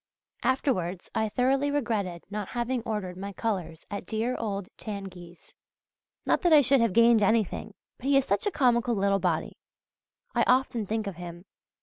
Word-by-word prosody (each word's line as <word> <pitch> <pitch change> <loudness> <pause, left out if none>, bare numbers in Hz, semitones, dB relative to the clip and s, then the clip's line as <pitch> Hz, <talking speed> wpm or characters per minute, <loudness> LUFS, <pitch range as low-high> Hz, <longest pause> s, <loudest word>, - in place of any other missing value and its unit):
Afterwards 195 - -1
I 220 -1 0
thoroughly 265 +5 +1
regretted 220 - -1
not 205 -2 -3
having 240 +1 -1
ordered 195 -5 -3
my 200 +1 -6
colours 185 -8 -3
at 200 -3 -5
dear 225 +3 -1
old 200 -4 -3
Tanguy's; 185 -4 -8 0.7
not - - +2
that 350 - +3
I 305 -2 +8
should 270 -1 +4
have 230 -5 +2
gained 230 0 +6
anything, 215 0 +1 0.2
but 260 - -5
he 280 0 +5
is 275 - +3
such 200 - 0
a - - +1
comical 240 -5 +2
little 195 0 +2
body! - - -1 0.8
I - - +2
often 250 -4 +2
think 220 +1 -1
of 195 -4 -5
him. 175 0 -8
220 Hz, 165 wpm, -28 LUFS, 195-250 Hz, 0.8 s, I